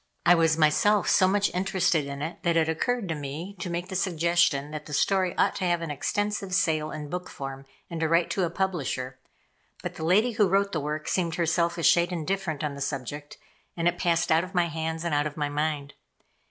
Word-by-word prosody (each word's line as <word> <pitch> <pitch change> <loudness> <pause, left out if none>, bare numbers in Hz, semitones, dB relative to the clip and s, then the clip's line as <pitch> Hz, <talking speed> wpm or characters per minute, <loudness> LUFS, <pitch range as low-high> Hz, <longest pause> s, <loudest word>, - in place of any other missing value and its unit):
I 175 - +7
was 165 -2 +3
myself 170 +6 +3
so 185 - +5
much 200 +1 +1
interested 180 -5 +1
in 140 +1 -5
it 160 +3 -5
that 170 -1 +1
it 160 -1 +3
occurred 205 +7 -1
to - - 0
me 150 +6 -6
to 175 - -4
make 170 +1 -3
the 190 - -5
suggestion 170 -5 +1
that 155 -1 -7
the 150 - -8
story 185 +2 +1
ought - - +2
to 185 - -2
have 175 -1 +1
an 165 - -4
extensive 205 +5 -2
sale 155 -4 +1
in 150 -1 -6
book 180 +4 -5
form, 135 0 -7 0.2
and 170 - -5
to 160 -1 0
write 170 +1 +2
to 190 - 0
a 170 - +1
publisher; 140 -9 -2 0.6
but - - -4
the - - -5
lady 205 +9 +3
who 210 -4 +2
wrote 200 +1 +2
the 160 - -1
work 150 +1 -4
seemed 170 -3 0
herself 170 0 +1
a 170 - -3
shade 175 +2 +4
indifferent 170 -2 -2
on 150 -2 -2
the 140 - -8
subject, 145 +2 -5 0.4
and 170 0 +1
it 175 0 0
passed 170 -1 +1
out 160 +1 +4
of 185 +1 -9
my 175 -1 +2
hands 160 +1 -3
and 170 -3 -1
out 145 +1 +2
of 150 - -9
my 145 -1 -1
mind. 145 -1 -2
165 Hz, 225 wpm, -27 LUFS, 150-180 Hz, 0.6 s, I